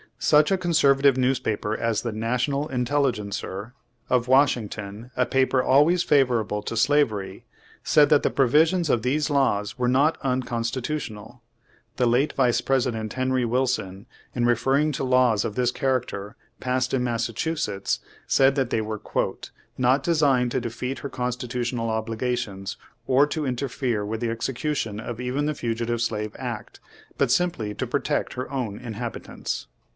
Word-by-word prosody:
Such 150 +4 +4
a 195 - +3
conservative 140 -6 +3
newspaper 120 -5 0
as 115 -1 0
the 120 - -3
National 125 +6 -1
Intelligencer, 120 -5 -2 0.4
of 125 -1 +2
Washington, 115 -5 +1
a 125 - +2
paper 130 -1 +2
always 155 +6 +4
favorable 120 -7 +2
to 115 - -4
slavery, 115 -6 +1 0.4
said 150 -2 +5
that 150 -2 +5
the - - +3
pro 135 +2 +2
visions 160 +5 +3
of 120 - +2
these 145 +6 0
laws 105 -6 +1
were 125 - +1
not 140 +6 +3
unconstitutional. 125 -2 -3 0.6
The 125 - +2
late 125 +5 +2
Vice 125 -3 +2
President 120 -5 0
Henry 130 -1 0
Wilson, 115 -6 -1 0.3
in 120 -1 +1
refer 120 +2 +2
ring 150 +2 +2
to 135 - -3
laws 125 -5 +3
of 105 - -4
this 125 -1 +1
character 125 -6 -2 0.2
passed 130 0 -1
in 125 - 0
Massachu 115 -1 0
Page 115 -2 -3
Twenty 160 0 -1
six 155 - -2
setts, 100 -9 -2 0.3
said 135 0 +4
that 135 -4 0
they 110 - +1
were 110 -1 -5 0.8
"not 130 +2 +3
designed 140 -7 +2
to - - 0
defeat 120 +3 -4
her 140 - -5
constitutional 125 -2 -3
obligations, 110 -3 -3 0.3
or 135 +2 +5
to 150 0 -3
interfere 125 -4 -2
with 110 +1 -3
the 120 - 0
execution 115 -1 -2
of 115 0 -6
even 125 +4 -1
the 150 0 -1
Fugitive 115 -1 -2
Slave 105 -2 -2
Act, - - -6 0.4
but - - +2
simply 125 -13 0
to - - -3
protect - - -1
her 125 - -5
own 120 -7 -3
inhabitants." 120 -1 -5
125 Hz, 155 wpm, -24 LUFS, 115-135 Hz, 0.8 s, said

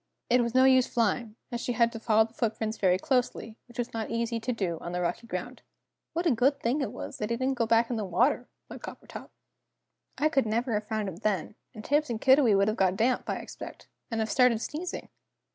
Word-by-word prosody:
It 250 0 +5
was 235 0 -2
no 260 - +6
use 260 -1 +5
flying, 225 -1 0 0.2
as 240 -1 -3
she 245 - -2
had 235 0 +3
to 225 - -7
follow 220 -1 +3
the 225 - -16
footprints 220 -1 -2
very 185 -2 +3
closely, 245 -1 -1
which 240 - -16
was 240 -1 -3
not 225 -1 -3
easy 230 0 -1
to 230 +3 -2
do 185 -8 -2
on 175 - -6
the 180 - -1
rocky 175 +6 -2
ground. 225 +6 -5 0.5
"What 340 +2 -1
a 330 - +4
good 265 +4 +2
thing 260 +5 0
it 245 -7 -2
was - - -7
that 210 - -2
he 235 - 0
didn't 260 +2 0
go 230 - +2
back 230 +1 +3
into 225 -2 -1
the - - -3
water," 245 - +2 0.2
thought - - -10
Coppertop; - - -9 0.9
"I 305 - +3
could 275 -6 +1
never 230 +3 0
have 210 0 -2
found 215 -2 -2
him 180 -3 -6
then, 210 -2 -1 0.2
and 215 - -9
Tibbs 295 0 +2
and 230 -2 -2
Kiddiwee 260 -6 +5
would 200 +1 +3
have 215 - 0
got 185 -1 +2
damp, 245 +3 +1
I - - 0
expect, - - -9 0.2
and 225 -1 -1
have 220 - -1
started 250 -4 +4
sneezing!" 330 +9 -5
230 Hz, 235 wpm, -28 LUFS, 215-250 Hz, 0.9 s, no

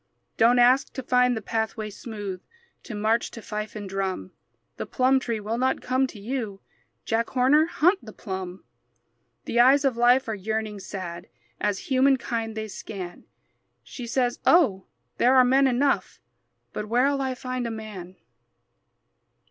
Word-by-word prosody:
Don't 235 +2 +4
ask 250 +2 +4
to 265 - -5
find 250 -1 +3
the 220 - -6
pathway 220 0 -2
smooth, 205 -4 -7 0.4
To 230 - -7
march 220 +3 +1
to - - -10
fife 215 0 -5
and 205 -2 -6
drum; 190 - -3 0.5
The - - -5
plum 260 +1 +3
tree 230 -4 -3
will 220 +3 -3
not 260 +1 +1
come 260 +1 +1
to 225 - -11
you; 220 -3 -4 0.5
Jack 230 +1 0
Horner, 275 +5 +4
hunt 355 +4 +2
the 215 - -10
plum. 190 -2 -6 0.8
The 240 - 0
eyes 270 +4 +6
of 260 -4 +1
life 245 +2 +4
are 220 - -2
yearning, 215 +1 -3
sad, 180 -2 -7 0.3
As 205 -1 0
humankind 245 -4 +1
they 220 0 -3
scan. 190 -3 -8 0.6
She 245 -3 -8
says, 245 0 0
"Oh, 240 - +4 0.3
there 255 +2 +5
are 255 -1 +7
men 270 +2 +4
enough, 265 +3 0 0.5
But 210 - -4
where'll 275 +4 +2
I 260 -1 -2
find 255 -1 -4
a - - -3
man?" 210 -5 -8
230 Hz, 155 wpm, -25 LUFS, 210-255 Hz, 0.8 s, are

